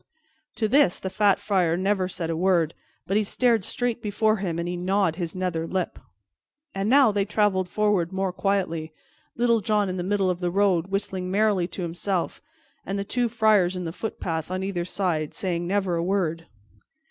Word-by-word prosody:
To 220 Hz, -1 st, 0 dB
this 260 Hz, -6 st, +4 dB
the 190 Hz, -, -5 dB
fat 205 Hz, -2 st, +3 dB
Friar 185 Hz, -5 st, +1 dB
said -, -, -3 dB
never 190 Hz, -1 st, +1 dB
a 165 Hz, 0 st, -1 dB
word, 170 Hz, -2 st, +2 dB, 0.3 s
but 195 Hz, -, +1 dB
he 215 Hz, -, +3 dB
stared 230 Hz, 0 st, +2 dB
straight 240 Hz, +3 st, -2 dB
before 215 Hz, +1 st, +1 dB
him, 180 Hz, -4 st, -3 dB
and 170 Hz, 0 st, -2 dB
he 175 Hz, -, -2 dB
gnawed 185 Hz, -1 st, +1 dB
his 170 Hz, -2 st, -3 dB
nether 175 Hz, -3 st, -2 dB
lip. 185 Hz, -1 st, -2 dB, 0.7 s
And 195 Hz, +2 st, -1 dB
now 270 Hz, -3 st, +6 dB
they 200 Hz, -1 st, +1 dB
traveled 195 Hz, -3 st, +1 dB
forward 205 Hz, -4 st, +1 dB
more 190 Hz, -1 st, -1 dB
quietly, 180 Hz, -5 st, -1 dB, 0.4 s
Little 235 Hz, -1 st, +2 dB
John 210 Hz, -2 st, +1 dB
in 185 Hz, -, -3 dB
the 175 Hz, -, -2 dB
middle 195 Hz, 0 st, +1 dB
of 175 Hz, -, -4 dB
the 180 Hz, -1 st, -1 dB
road 185 Hz, -2 st, +2 dB
whistling 190 Hz, -2 st, -3 dB
merrily 200 Hz, -2 st, +2 dB
to 185 Hz, -, -6 dB
himself, 175 Hz, +2 st, -2 dB, 0.4 s
and 195 Hz, -, -3 dB
the 200 Hz, -, -1 dB
two 240 Hz, +3 st, -1 dB
friars 215 Hz, -5 st, +3 dB
in 180 Hz, -, -4 dB
the 165 Hz, -, -4 dB
footpath 165 Hz, -6 st, -4 dB
on 185 Hz, +1 st, -2 dB
either 185 Hz, -3 st, -2 dB
side 170 Hz, -5 st, -2 dB
saying 175 Hz, -2 st, -2 dB
never 190 Hz, -1 st, 0 dB
a 165 Hz, -, -1 dB
word. 170 Hz, -3 st, -1 dB
190 Hz, 190 wpm, -25 LUFS, 175-205 Hz, 0.7 s, now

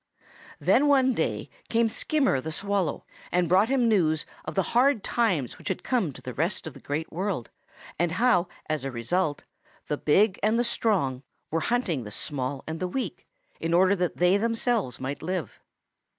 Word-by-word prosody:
"Then 290 Hz, -, +4 dB
one 265 Hz, -2 st, +4 dB
day -, -, -1 dB, 0.2 s
came 230 Hz, 0 st, +3 dB
Skimmer 265 Hz, -, +1 dB
the 160 Hz, -, -5 dB
Swallow 195 Hz, -1 st, -1 dB, 0.3 s
and 180 Hz, -1 st, +2 dB
brought 190 Hz, +7 st, +4 dB
him 260 Hz, -3 st, +3 dB
news 160 Hz, -8 st, +2 dB, 0.2 s
of 155 Hz, -, -5 dB
the 190 Hz, -, -1 dB
hard 250 Hz, -2 st, +4 dB
times 185 Hz, -, 0 dB
which -, -, -10 dB
had 190 Hz, -, -2 dB
come 230 Hz, -, 0 dB
to -, -, -13 dB
the 125 Hz, -, -5 dB
rest 165 Hz, -, -1 dB
of 160 Hz, -, -6 dB
the -, -, -12 dB
Great 150 Hz, +3 st, -4 dB
World 180 Hz, -, -3 dB, 0.5 s
and 175 Hz, -1 st, +1 dB
how 185 Hz, -4 st, +3 dB, 0.2 s
as 155 Hz, -3 st, -1 dB
a 135 Hz, -, -2 dB
result 145 Hz, +6 st, -1 dB, 0.5 s
the 150 Hz, -, 0 dB
big 195 Hz, +6 st, +3 dB
and 215 Hz, +2 st, +2 dB
the 240 Hz, -, +3 dB
strong 190 Hz, -, 0 dB, 0.3 s
were 165 Hz, -, +1 dB
hunting 180 Hz, -, 0 dB
the 105 Hz, -, -7 dB
small 135 Hz, +4 st, -3 dB
and 160 Hz, +1 st, -5 dB
the 185 Hz, -, -1 dB
weak 255 Hz, +8 st, -4 dB, 0.3 s
in 165 Hz, +1 st, 0 dB
order 185 Hz, +3 st, +5 dB
that 180 Hz, -2 st, -1 dB
they 180 Hz, +3 st, +4 dB
themselves 230 Hz, -, 0 dB
might 135 Hz, +2 st, -4 dB
live. 180 Hz, 0 st, -4 dB
180 Hz, 180 wpm, -27 LUFS, 155-225 Hz, 0.5 s, order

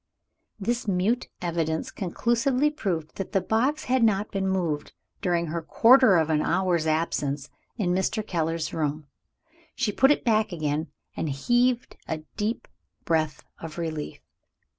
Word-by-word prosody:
This 235 Hz, +3 st, -1 dB
mute 200 Hz, +6 st, +1 dB
evidence 165 Hz, -2 st, -1 dB
conclusively 240 Hz, -, +1 dB
proved 175 Hz, -, -3 dB
that 195 Hz, -, -5 dB
the 195 Hz, -, +4 dB
box 235 Hz, +10 st, 0 dB
had 255 Hz, 0 st, +1 dB
not 210 Hz, -1 st, +2 dB
been 195 Hz, -1 st, -1 dB
moved 170 Hz, -6 st, -1 dB, 0.3 s
during 175 Hz, -3 st, +1 dB
her 165 Hz, +1 st, -3 dB
quarter 230 Hz, +3 st, +6 dB
of 160 Hz, -1 st, +2 dB
an 150 Hz, -1 st, +2 dB
hour's 175 Hz, -2 st, +1 dB
absence 145 Hz, -3 st, -1 dB, 0.3 s
in 190 Hz, -6 st, 0 dB
Mr. 200 Hz, +3 st, 0 dB
Keller's 165 Hz, -4 st, -2 dB
room. 150 Hz, -1 st, -2 dB, 0.7 s
She 210 Hz, -, 0 dB
put 270 Hz, +6 st, +4 dB
it 295 Hz, -, +2 dB
back 220 Hz, -2 st, +2 dB
again, 155 Hz, -1 st, -1 dB, 0.3 s
and 160 Hz, -, -2 dB
heaved 240 Hz, -, +1 dB
a 155 Hz, -1 st, -3 dB
deep 215 Hz, +3 st, -2 dB, 0.4 s
breath 155 Hz, -3 st, 0 dB, 0.2 s
of 165 Hz, -1 st, -8 dB
relief. 160 Hz, -3 st, -4 dB
180 Hz, 140 wpm, -26 LUFS, 160-220 Hz, 0.7 s, quarter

